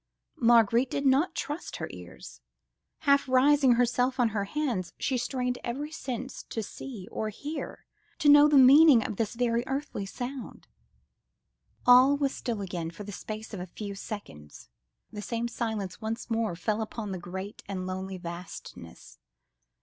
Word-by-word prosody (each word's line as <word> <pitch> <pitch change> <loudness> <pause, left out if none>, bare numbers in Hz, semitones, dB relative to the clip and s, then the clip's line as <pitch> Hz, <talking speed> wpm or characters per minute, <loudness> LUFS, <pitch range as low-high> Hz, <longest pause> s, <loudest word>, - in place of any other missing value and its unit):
Marguerite 235 +1 +4
did 280 - -2
not 285 +7 +3
trust 295 +4 -4
her - - -4
ears. - - -11 0.6
Half 280 -3 +3
raising 265 0 +5
herself 245 +2 +1
on 240 -2 +4
her 205 -2 -2
hands, 235 - -2
she 265 - -1
strained 250 0 -2
every 285 +6 -4
sense 260 -4 -5
to 225 - -3
see 215 -3 -8
or 215 - -2
hear, 290 +9 -6 0.3
to 300 - 0
know 290 0 +9
the 295 -1 +4
meaning 270 -1 +8
of 205 - -4
this 225 +1 -2
very 235 -1 +1
earthly 270 -7 -3
sound. 245 +2 -7 1.2
All 255 +3 +7
was 280 -2 0
still 230 -5 -3
again 175 -4 -4
for 170 +5 -9
the 205 - -7
space 215 +3 -7
of 200 - -5
a 180 - -6
few 200 +3 -7
seconds; 75 - -9 0.4
the 210 - -6
same 230 +2 -2
silence 220 -5 -4
once 225 +2 -4
more 225 -5 0
fell 210 +5 -1
upon 215 -1 -5
the 185 - -4
great 190 +4 -7
and 190 -2 -4
lonely 190 +1 -4
vastness. 170 - -9
230 Hz, 155 wpm, -28 LUFS, 200-265 Hz, 1.2 s, know